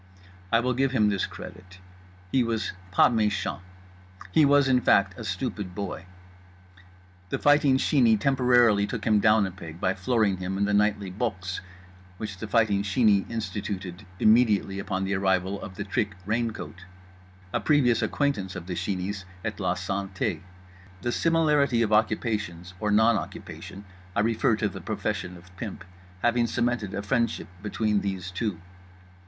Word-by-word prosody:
I 115 - +4
will 125 +1 0
give 135 +2 +1
him 105 -5 +3
this 100 -2 0
credit: 90 0 -11 0.5
he 130 - +3
was 115 -3 -2 0.2
pas 90 - +5
méchant, 105 -2 0 0.7
he 155 -2 +5
was, 140 -1 +4
in 130 -1 +3
fact, 100 -4 +3
a 115 - -8
stupid 100 -2 -4
boy. 100 -2 -5 1.2
The - - -1
Fighting 145 -2 +4
Sheeney 120 -6 +3
temporarily 120 -5 +4
took 105 -1 -5
him 105 -2 +4
down 110 0 +4
a 95 - -4
peg 85 -3 -10
by 95 - +1
flooring 105 0 +1
him 95 +1 -3
in 100 - +1
the 105 - 0
nightly 100 -2 +1
"Boxe" 95 -3 -3 0.6
which 100 -2 -6
The 110 - -5
Fighting 105 -3 +2
Sheeney 105 -1 +2
instituted 105 -4 -5
immediately 110 -4 +3
upon 95 -1 -2
the 95 +1 -1
arrival 95 0 0
of 95 - -8
The 100 - -4
Trick 100 0 -2
Raincoat—a 90 -4 -5
previous 130 -7 +3
acquaintance 105 -11 -1
of 90 -2 -6
The 90 - -4
Sheeney's 95 +2 -3 0.2
at - - -3
La - - 0
Santé; 95 -3 -3 0.6
the 120 - 0
similarity 150 -6 +2
of 110 -1 0
occupations 105 -5 0
(or 105 - -1
non 110 +2 +4
occupation; 100 +1 -9 0.3
I - - +3
refer 115 0 +2
to 105 0 0
the 95 - -7
profession 90 0 -3
of 90 +1 -18
pimp) 105 -1 -6 0.4
having 120 0 +3
cemented 120 -3 -1
a 100 - -3
friendship 115 -1 -1
between 105 0 0
these 95 -2 -4
two. 95 -2 -3
105 Hz, 155 wpm, -26 LUFS, 95-115 Hz, 1.2 s, pas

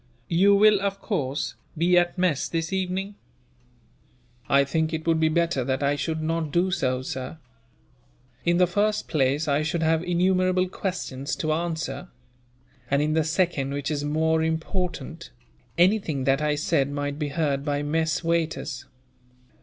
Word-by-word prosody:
"You 195 +4 +5
will, 210 0 +5
of 200 0 -2
course, 150 - -2 0.2
be 175 +3 +3
at 175 +1 +2
mess 180 -6 +1
this 165 +2 -2
evening?" 190 +1 -2 1.4
"I 140 0 +5
think 160 +3 0
it 160 0 -3
would 165 -1 +2
be 160 0 +3
better 170 -4 +1
that 130 +2 -1
I 140 +1 +2
should 155 +3 -2
not 160 -1 -1
do 180 +3 +2
so, 130 -8 0
sir. 130 +4 -5 1.1
In 170 0 +2
the 180 - +5
first 205 +4 0
place, 145 +1 +1
I 145 +1 +2
should 165 +2 -1
have 160 0 +2
innumerable 185 +1 +2
questions 155 -7 -4
to 155 -1 -1
answer; 170 +2 -3 0.8
and 140 - +2
in 155 +1 0
the 160 0 +2
second, 155 -4 0
which 145 +1 -3
is 145 -1 -2
more 160 +2 +1
important, 165 0 -3 0.5
anything 175 -6 +2
that 135 +2 +2
I 150 -1 +1
said 140 -2 +1
might 145 0 -3
be 150 - -1
heard 145 -2 -1
by 145 -1 -1
mess 160 +2 0
waiters. 160 -4 -1
160 Hz, 155 wpm, -25 LUFS, 145-175 Hz, 1.4 s, You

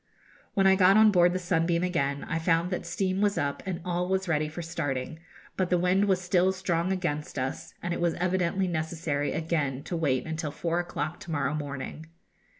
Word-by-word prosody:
When 195 -2 +3
I 190 - +7
got 190 +1 +6
on 215 0 +7
board 175 -2 +5
the 185 - -1
'Sunbeam' 170 -1 +1
again, 140 -6 0
I 165 - -1
found 165 +2 +1
that 180 - -3
steam 190 -1 -1
was 205 -1 +2
up 140 0 -1
and 180 -2 -2
all 180 0 -1
was 190 0 0
ready 155 -2 +1
for 170 +3 -6
starting; 145 -3 -3 0.4
but 185 -2 0
the 180 - +3
wind 180 +3 +3
was 190 -2 +2
still 180 +1 +2
strong 185 -2 -1
against 160 -7 -2
us, 130 0 -4
and 175 0 -1
it - - -3
was 170 -1 +1
evidently 185 +1 0
necessary 160 -3 -2
again 150 -5 -1
to 175 - -4
wait 135 -6 0
until 160 -1 -3
four 170 +3 -1
o'clock 165 -1 -3
to 170 - -8
morrow 145 -1 0
morning. 145 +1 -5
170 Hz, 200 wpm, -28 LUFS, 155-185 Hz, 0.4 s, I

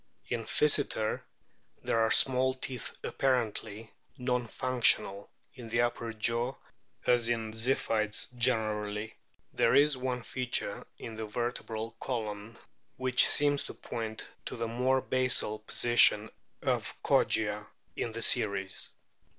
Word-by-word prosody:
In 115 -2 -2
Physeter 145 -7 +1 0.6
there 115 - +1
are 110 0 +3
small 130 +1 +3
teeth 130 -2 -6
apparently 115 -4 -1 0.3
non 125 -1 -1
functional 120 -5 +2 0.2
in 120 -2 -10
the 115 +1 +2
upper 120 -1 -1
jaw 115 +4 0 0.5
as 120 -1 +3
in 115 -2 -1
the 110 - -9
Ziphiids 115 -2 0
generally. 110 -3 0 0.4
There - - +3
is 145 -1 +5
one 125 -1 -3
feature 125 0 -2
in 110 -1 -8
the 110 -1 -4
vertebral 115 0 -4
column 110 -2 -4 0.4
which 130 -1 +5
seems 145 -1 +2
to - - -8
point 110 -1 -5 0.2
to - - -5
the 115 0 -3
more 130 +3 +1
basal 125 -5 +1
position 110 -1 +4 0.3
of - - -1
Kogia 105 -1 +2 0.3
in 115 - -3
the 115 +1 -3
series. 95 -3 +1
115 Hz, 125 wpm, -30 LUFS, 110-125 Hz, 0.6 s, is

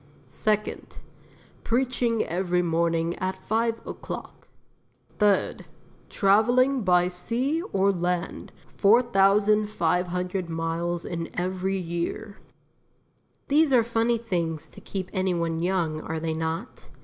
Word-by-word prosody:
Second 210 +8 -2 0.7
Preaching 240 -2 +1
every 180 0 0
morning 165 0 +1
at 185 0 -2
five 225 +4 -1
o'clock. - - -8 0.7
Third 205 -2 +2 0.4
Travelling 245 +6 +3
by 180 -3 +3
sea 240 - -1
or 195 0 +3
land 175 -1 -3 0.3
4,500 195 -5 +2
miles 165 +1 -2
in 165 -1 -4
every 185 +1 -1
year." 175 +4 -4 1.1
These 295 +1 +3
are 245 -3 +5
funny 230 +1 +1
things 170 -9 -3
to - - -13
keep 190 -2 -5
any 185 -2 0
one 165 -1 -1
young, 170 -4 0
are 160 0 -4
they 160 0 -2
not? 160 +1 -4
185 Hz, 105 wpm, -26 LUFS, 170-220 Hz, 1.1 s, are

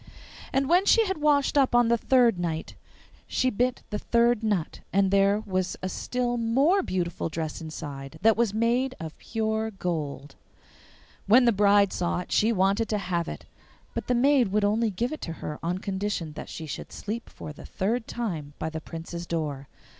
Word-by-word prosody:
And 270 0 +1
when 360 +5 +4
she 455 -1 +6
had 380 -5 -2
washed 290 -1 +3
up 260 -3 +3
on 240 -1 +5
the 235 - +4
third 235 -4 +3
night 165 -2 -3 0.5
she 255 - +1
bit 250 +3 0
the 210 - -2
third 235 -1 +2
nut, 205 -7 -1
and 195 0 +3
there 200 +1 +3
was 185 -2 -1
a 185 - -1
still 245 +5 -2
more 270 +12 +3
beautiful 175 - -2
dress 160 0 -4
inside 145 -4 -7
that 225 0 +6
was 235 -2 +2
made 240 +4 +1
of 160 -1 -7
pure 220 -1 -1
gold. 155 -8 -4 0.9
When 245 +5 +6
the 235 - +5
bride 200 -1 +4
saw 175 -1 -1
it - - -11
she 220 +2 +3
wanted 200 +2 +2
to 215 - +1
have 175 -4 -2
it, - - -7 0.5
but - - -4
the 250 - +2
maid 265 -1 +4
would 205 +2 +1
only 220 +2 +2
give 235 +8 -2
it 310 - -5
her 160 -2 -6
on 175 +2 -1
condition 190 -5 -3
that - - -8
she 160 - -6
should 150 - -7
sleep 225 +3 -5
for 150 - -9
the - - -12
third 225 +5 -1
time 165 -12 -4
by 160 - -3
the 160 0 -5
Prince's 170 +2 -7
door. 150 -5 -3
205 Hz, 185 wpm, -27 LUFS, 170-240 Hz, 0.9 s, she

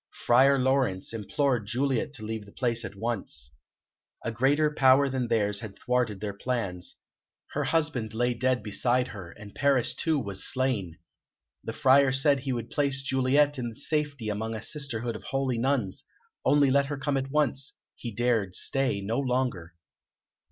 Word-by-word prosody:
Friar 135 +3 +5
Laurence 130 -8 +1
implored 115 +2 -1
Juliet 135 +4 0
to 120 -7 -5
leave 110 -1 -5
the - - -14
place 120 -1 -1
at 105 - -7
once. 95 - -2 0.7
A 115 - -1
greater 140 +6 +2
power 135 0 +5
than 130 -2 -2
theirs 105 -3 +1
had 100 -2 -8
thwarted 125 -5 -1
their 105 -1 -3
plans; 100 -5 -3 0.6
her 145 0 -1
husband 145 -7 0
lay 120 +1 +1
dead 125 -1 0
beside 125 +4 +1
her, 95 -5 -8
and 100 +3 -12
Paris, 140 -4 +2
too, 160 -2 0
was 100 -7 -3
slain. 120 -11 -1 0.7
The - - -5
Friar 135 +1 +5
said 135 +1 +4
he 135 +1 -3
would 120 -2 -4
place 140 -2 0
Juliet 135 +2 +2
in 120 -2 -4
safety 145 -5 -2
among 110 +2 -3
a 110 - -6
sisterhood 120 -6 -2
of - - -9
holy 135 -3 -1
nuns, 120 -7 0 0.4
only 145 -2 +4
let 140 0 +3
her 145 0 -4
come 140 +1 -1
at 135 0 -2
once; 140 -2 0 0.2
he 120 - -6
dared 110 -5 0
stay 135 -7 0
no 110 +6 -1
longer. 125 -10 -2
125 Hz, 165 wpm, -27 LUFS, 110-135 Hz, 0.7 s, Friar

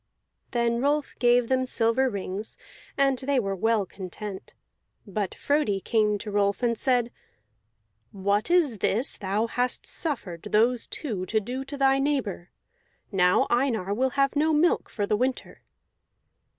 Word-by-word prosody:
Then 235 -1 0
Rolf 290 +1 0
gave 245 -1 +4
them 260 0 +1
silver 250 +2 +2
rings, 200 0 -5 0.4
and 275 -2 +2
they 275 0 +1
were 195 -4 -2
well 220 +1 +1
content. 190 +1 -8 0.5
But 200 -2 -3
Frodi 285 -9 +1
came 210 0 +1
to 210 +1 -7
Rolf, 200 +2 +1
and 235 -1 +2
said: 245 -1 +1 1.0
"What 200 - 0
is 315 - +3
this 235 +9 0
thou 200 +2 -1
hast 245 +2 -1
suffered 210 - -3
those 230 +3 +2
two 205 - -4
to 220 - +1
do 250 +5 -5
to 285 +1 -7
thy 270 0 +3
neighbor? 265 -11 -1 0.6
Now 180 -2 +3
Einar 240 -6 +1
will 260 +5 +1
have 275 0 +2
no 310 +2 +2
milk 325 +3 +2
for 205 - -2
the 210 - +1
winter." 255 +4 -2
235 Hz, 145 wpm, -26 LUFS, 205-265 Hz, 1.0 s, gave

